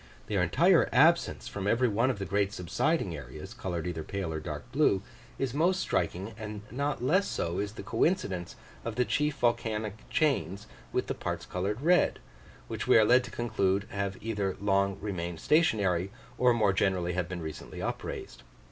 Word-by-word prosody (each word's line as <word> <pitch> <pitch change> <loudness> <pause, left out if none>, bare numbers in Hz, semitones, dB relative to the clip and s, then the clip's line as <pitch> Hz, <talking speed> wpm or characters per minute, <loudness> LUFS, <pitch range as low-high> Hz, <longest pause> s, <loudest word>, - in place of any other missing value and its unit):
Their - - 0
entire - - +4
absence - - +4
from 100 -1 -4
every 120 +4 +3
one 115 +4 +2
of 130 - -1
the 100 - -4
great 100 +2 +1
subsiding 100 - 0
areas, 65 -4 -9
coloured 85 -4 -4
either 85 -2 -3
pale 95 -2 -3
or 80 - -2
dark 75 +10 -7
blue, 130 -9 +3 0.3
is 130 -3 -2
most 175 +6 +2
striking 95 - -1
and 105 -1 -6
not 140 +1 -2
less 190 +10 +3
so 85 +1 -2
is 100 0 -2
the 110 - -8
coincidence 100 - 0 0.3
of 115 -2 -4
the 125 +1 +2
chief 150 +2 0
volcanic 110 -3 -1
chains 105 - 0 0.3
with - - 0
the - - -2
parts - - -4
coloured 100 +6 -2
red, 175 +4 +4 0.5
which - - -4
we - - +7
are 110 - +6
led 125 +3 +5
to - - -8
conclude 100 -4 0
have 100 -1 -2
either 105 -4 -2
long 100 -1 +1
remained 85 -5 -4
stationary, 100 - +2 0.3
or 125 -1 +5
more 110 -5 +3
generally 95 -2 +1
have 90 -1 -2
been 90 -3 -5
recently 80 -1 -7
upraised. - - -5
100 Hz, 175 wpm, -29 LUFS, 90-120 Hz, 0.5 s, we